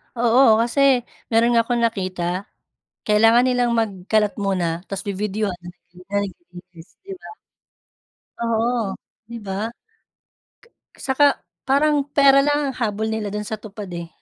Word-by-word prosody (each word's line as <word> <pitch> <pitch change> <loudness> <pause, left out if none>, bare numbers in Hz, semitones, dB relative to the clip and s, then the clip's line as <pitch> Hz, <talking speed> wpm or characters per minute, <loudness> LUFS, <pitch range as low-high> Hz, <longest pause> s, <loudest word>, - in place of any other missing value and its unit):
Oo, 240 +2 +4 0.2
kasi 235 +4 -1 0.5
meron 230 +1 +4
nga 230 - +5
akong 240 0 -1
nakita, 185 -6 -2 0.8
kailangan 225 +3 +5
nilang 245 -1 +1
magkalat 210 0 0
muna 190 -3 0 0.2
tas 195 - -5
bibidyuhan 200 -1 -2 0.3
kunyari 200 +3 -4
naglinis 175 - -15
sila. 385 -1 -10 1.1
Oo, 230 -2 0 0.3
'di 235 - -7
ba? 200 +2 -4 1.3
Saka 280 +2 +2 0.4
parang 285 +1 +2
pera 275 -1 +6
lang 290 +1 +2
ang - - -12
habol 220 -2 -1
nila 220 -2 -3
dun 210 0 -3
sa 220 -1 -5
TUPAD, 205 -3 -9
eh. 170 -1 -6
220 Hz, 120 wpm, -21 LUFS, 195-245 Hz, 1.3 s, pera